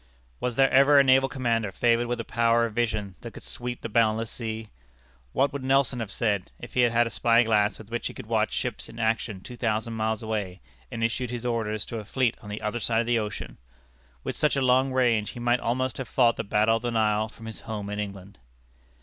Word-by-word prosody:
Was 125 -2 -2
there 135 +1 +4
ever 140 +2 +6
a - - +7
naval 135 0 +4
commander 115 -5 0
favored 120 +3 +2
with 120 0 -2
a - - -2
power 115 0 +2
of 115 - -5
vision 110 -4 -1
that - - -9
could - - -10
sweep 120 0 -6
the - - -4
boundless 115 0 +1
sea? 110 -2 -5 0.6
What 135 - +1
would 140 -2 -4
Nelson 135 -1 +2
have 115 -3 -4
said, 105 -5 0
if 120 - -10
he - - -1
had 120 -1 +5
had 120 0 +3
a 115 - -4
spy 115 0 +4
glass 105 -2 +2
with 110 0 -13
which 120 -1 -2
he - - -7
could - - -8
watch - - +1
ships - - -3
in 115 - -12
action 110 -3 -1
two 125 - -9
thousand 115 -1 -1
miles 110 0 -1
away, 105 -4 -3 0.3
and 115 - -3
issue 120 +2 0
his 120 0 -5
orders 110 -3 -1
to 115 - -5
a - - -7
fleet 125 +2 0
on 105 - -10
the 105 +2 -6
other 105 +3 -2
side 115 0 +2
of - - -3
the 120 0 +2
ocean? 105 - -6 0.6
With - - -3
such 150 - +2
a 135 - +1
long 130 +1 +3
range, 120 -5 +2
he - - -8
might 120 +1 +2
almost 130 +2 -1
have 130 - -4
fought 120 -2 +3
the - - -3
Battle 110 +2 +2
of - - -8
the 120 - -2
Nile 110 -1 +1
from 115 - -13
his 110 -1 -6
home 105 -2 -5
in 105 - -3
England. 100 -3 -7
115 Hz, 240 wpm, -26 LUFS, 110-120 Hz, 0.6 s, a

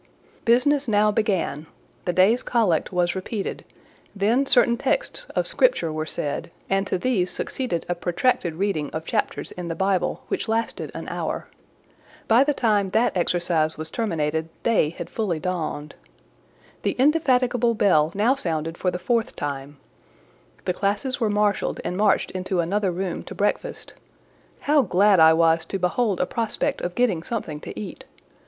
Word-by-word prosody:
Business 260 +4 +3
now 210 -1 +3
began: 190 -8 -1 0.4
the 180 - +1
day's 190 +7 +4
Collect 210 -10 +1
was 175 -1 +1
repeated, 195 +2 -4 0.5
then 230 +8 +2
certain 245 -2 +4
texts - - -1
of - - +1
Scripture 485 - +2
were 155 0 -3
said, 145 +1 -3 0.2
and 195 0 +1
to 185 - 0
these 185 -4 0
succeeded 245 -11 -2
a 175 - 0
protracted 175 0 0
reading 175 -5 -1
of 160 0 -4
chapters - - -2
in 180 -1 -6
the 165 - -3
Bible, 190 0 0
which - - -2
lasted 225 +1 -2
an - - -6
hour. - - -3 0.8
By 230 +4 +6
the 295 - +1
time 210 -4 +2
that 220 +3 +1
exercise 170 -3 +1
was 155 0 -5
terminated, 160 -7 -1
day 220 -10 +3
had 170 - -7
fully 195 -8 -2
dawned. 160 -4 -3 0.9
The - - 0
indefatigable 250 -5 +3
bell 160 -7 +3
now 220 +6 +3
sounded 165 - -3
for 185 - +1
the 180 - -3
fourth 230 +4 -1
time: 140 0 -5 0.9
the - - +1
classes 205 +7 -1
were 225 -3 +1
marshalled 205 -1 0
and 180 - -2
marched 205 +1 +2
into 185 0 -2
another 195 +4 +1
room 180 0 -3
to - - -8
breakfast: 465 - -2 0.7
how 295 0 +4
glad 200 -3 +4
I 160 0 +8
was 165 0 +3
to 195 - -2
behold 190 +3 0
a - - +2
prospect 225 +3 -2
of 175 0 -4
getting 230 -10 +1
something 165 -7 -4
to 105 - -8
eat! 105 - -8
195 Hz, 160 wpm, -24 LUFS, 170-230 Hz, 0.9 s, I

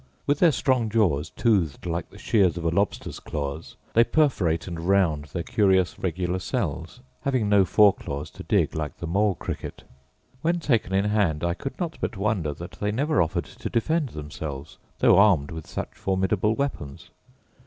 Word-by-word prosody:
With 145 0 +1
their 170 -3 +6
strong 130 -5 +1
jaws, 85 -9 +1
toothed 95 - 0
like 85 -1 -3
the - - -15
shears 95 -6 +2
of 85 - -5
a - - +3
lobster's 100 +4 -1
claws, 75 +1 -5 0.2
they 115 - +6
perforate 100 - +1
and 85 -2 -5
round 85 -4 +2
their 85 +4 -5
curious 95 -2 +2
regular 90 0 -1
cells, 90 - -3 0.2
having 130 -6 0
no 100 -2 +5
fore 100 +2 +5
claws 70 +1 -6
to - - -11
dig, - - +1
like 75 -2 -4
the - - -6
mole 100 +3 +1
cricket. - - -6 0.6
When 170 +2 +1
taken 120 - 0
in 100 +1 +2
hand 100 -8 +1
I 85 0 +1
could 135 +9 -7
not 170 -3 -3
but 110 - -2
wonder 95 -6 0
that 85 +5 -9
they 105 - +1
never 145 +7 +1
offered 80 - -1
to - - -7
defend 150 +5 0
themselves, 75 -3 -7 0.2
though 90 - +5
armed 95 -9 +4
with 80 -1 -7
such - - -5
formidable 95 +3 0
weapons. 125 - -4
95 Hz, 175 wpm, -25 LUFS, 80-110 Hz, 0.6 s, their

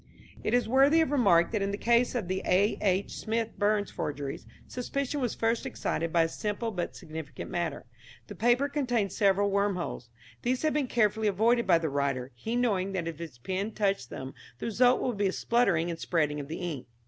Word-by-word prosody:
It - - +1
is 245 - +2
worthy 275 +6 +5
of 315 - 0
remark 195 -12 +4
that 215 -3 0
in 195 - 0
the 200 - -2
case 235 +3 +2
of 220 -7 -2
the 185 +1 -1
A. 195 +4 +3
H. 195 -1 0
Smith 225 0 -1
Burns 205 0 +1
forgeries, 140 -1 -4 0.2
suspicion 275 +3 -3
was 245 -3 -1
first 230 +1 0
excited 165 0 -2
by 170 0 +4
a - - +1
simple 210 +6 -3
but 180 -4 -4
significant 155 -2 -8
matter. 175 -1 -2 0.4
The - - -9
paper 240 +5 +2
contained 245 -9 0
several 200 0 +2
worm 200 0 +1
holes. 150 -9 -5 0.3
These 250 +3 -1
had 310 - +2
been 295 -3 0
carefully 220 -2 +2
avoided 230 +4 +2
by 175 -3 +6
the 165 -1 -2
writer, 140 -2 -1
he 220 - -4
knowing 200 -6 +1
that 175 -3 -2
if 165 -2 -5
his 160 -7 -8
pen 190 - -3
touched 195 - 0
them 130 0 -7 0.2
the - - -6
result 245 +3 +3
would 245 -5 -1
be 200 -1 +2
a - - 0
spluttering 190 -8 +1
and 165 - -6
spreading 150 -4 0
of 140 - -6
the 160 - -5
ink. 160 -9 -5
200 Hz, 205 wpm, -29 LUFS, 170-235 Hz, 0.4 s, by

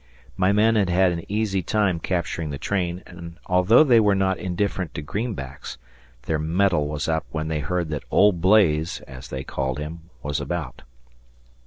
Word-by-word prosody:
My 95 +1 +2
men 110 +2 +3
had 100 -4 +2
had 90 +1 +3
an 85 -1 -4
easy 105 -3 0
time 95 -1 0
capturing 85 -2 -2
the 70 - -4
train, 90 +1 -2
and, 85 -1 -10
although 90 +9 +5
they 125 -6 +5
were 105 -2 +3
not 95 -1 +1
indifferent 95 -1 -2
to 75 - -4
greenbacks, 75 - -5 0.5
their 80 +1 -1
mettle 80 -1 +1
was 75 -1 -3
up 80 0 -1
when 80 0 -3
they 80 -1 -1
heard 90 +2 -2
that 75 -2 -4
"Old 100 -5 +4
Blaze", 85 -5 +3
as 65 -1 -11
they 65 0 -5
called 65 -1 -3
him, 80 +2 -7
was 75 0 -2
about. 75 -2 -4
85 Hz, 175 wpm, -23 LUFS, 75-95 Hz, 0.5 s, although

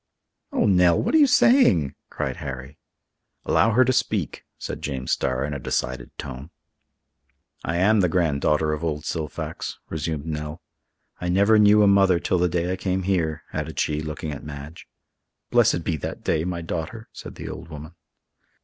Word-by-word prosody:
"Oh, - - +1
Nell! 90 -4 +4
what - - -1
are 320 - +6
you 290 - +7
saying?" 230 - +4 0.2
cried - - -3
Harry. 65 +1 -7 0.7
"Allow 115 0 +3
her 130 +3 +5
to 130 - +2
speak," - - -1
said - - -6
James 65 -3 -3
Starr 65 +1 0
in 75 - -4
a 70 - -4
decided 65 -1 -2
tone. 65 +2 -7 1.1
"I 80 - -2
am 105 +4 +4
the 90 -3 +3
granddaughter 75 -2 +1
of 75 +1 -4
old 75 -2 -2
Silfax," 75 -3 -4
resumed 80 -1 -3
Nell. 75 +1 -5 0.6
"I 90 - -3
never 100 +4 +4
knew 105 0 +6
a - - +5
mother 95 -3 +4
till 90 - 0
the 90 0 +2
day 85 +1 -1
I - - -3
came 95 0 -1
here," 85 -5 0
added 80 +1 -4
she, 75 0 0
looking 75 0 -5
at 70 - -7
Madge. 75 +2 -9 0.6
"Blessed 85 - +3
be 80 - -1
that - - -6
day, 80 0 0
my 90 -1 -3
daughter!" 85 +7 -5
said - - -9
the - - -7
old - - -8
woman. 80 +1 -9
80 Hz, 175 wpm, -24 LUFS, 75-95 Hz, 1.1 s, you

